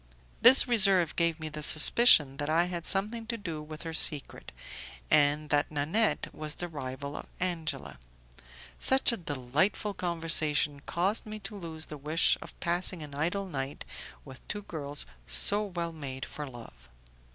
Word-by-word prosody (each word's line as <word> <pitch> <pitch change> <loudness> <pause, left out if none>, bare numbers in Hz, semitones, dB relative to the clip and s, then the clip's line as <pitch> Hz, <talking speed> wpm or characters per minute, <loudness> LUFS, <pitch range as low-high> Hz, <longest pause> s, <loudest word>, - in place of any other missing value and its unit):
This 260 +3 +8
reserve 195 -8 +4
gave 170 -1 0
me 160 - -6
the 155 0 -7
suspicion 150 - +6
that 145 0 -4
I 165 +2 +3
had 175 -2 -6
something 220 +4 0
to 230 0 -4
do 165 -7 -6
with 155 +1 -10
her 165 -1 -6
secret, 150 -3 +2 0.6
and 150 +1 +2
that 145 0 +1
Nanette 160 +10 0
was 155 -1 -4
the 175 - -4
rival 140 -2 -7
of - - -8
Angela. 160 - -4 0.8
Such 265 -1 +3
a 235 - -2
delightful 155 +7 -2
conversation 160 -5 -1
caused 195 +6 -1
me 215 0 -7
to 205 +2 -7
lose 165 -4 -7
the 150 - -9
wish 155 +4 +2
of - - -12
passing 175 -1 -1
an 145 -1 -11
idle 175 +7 -2
night 135 -6 -6 0.4
with 130 -2 -12
two 205 -1 -6
girls 145 -6 -5 0.2
so - - +1
well 175 -5 -5
made 135 -4 -7
for 150 -1 -7
love. 90 - -14
160 Hz, 160 wpm, -28 LUFS, 145-185 Hz, 0.8 s, This